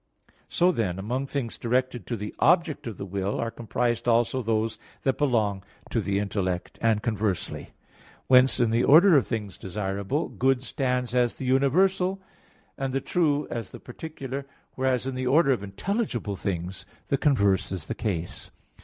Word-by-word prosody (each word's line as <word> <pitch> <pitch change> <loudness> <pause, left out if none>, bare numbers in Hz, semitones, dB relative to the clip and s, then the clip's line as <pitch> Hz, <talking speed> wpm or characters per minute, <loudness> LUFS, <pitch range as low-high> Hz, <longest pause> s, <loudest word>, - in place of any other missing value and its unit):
So 180 +1 +3
then, 100 - -1
among 125 +8 -2
things 135 -5 -4
directed 125 +1 -1
to 120 - -2
the 105 +1 -6
object 165 -2 +3
of 110 - -6
the - - -5
will, 100 +1 -2
are 115 0 -1
comprised 120 +1 -2
also 120 +2 +2
those 110 -1 -1 0.2
that 135 - 0
belong 110 -9 +1 0.3
to - - +1
the 100 0 -1
intellect; 95 -3 -2
and 110 -2 +2
conversely. 110 -5 -2 0.5
Whence 130 0 +5
in 120 -2 +3
the 115 +2 +2
order 170 +5 +7
of 135 - +4
things 105 -5 -4
desirable, 100 - -2
good 130 0 +1
stands 125 -3 -1
as 125 -1 +2
the 130 - -6
universal, 180 +9 +2 0.6
and 135 -1 -2
the 135 - +1
true 150 -1 +1
as 115 -5 -4
the - - -10
particular; 140 0 -7 0.3
whereas 130 -1 0
in 135 - -2
the 130 0 -2
order 140 +2 +4
of 125 - +1
intelligible 115 - -2
things 90 -1 -4 0.2
the 140 - +2
converse 100 - +2
is 90 -5 -4
the - - -3
case. 90 -6 -4
120 Hz, 165 wpm, -26 LUFS, 105-135 Hz, 0.6 s, order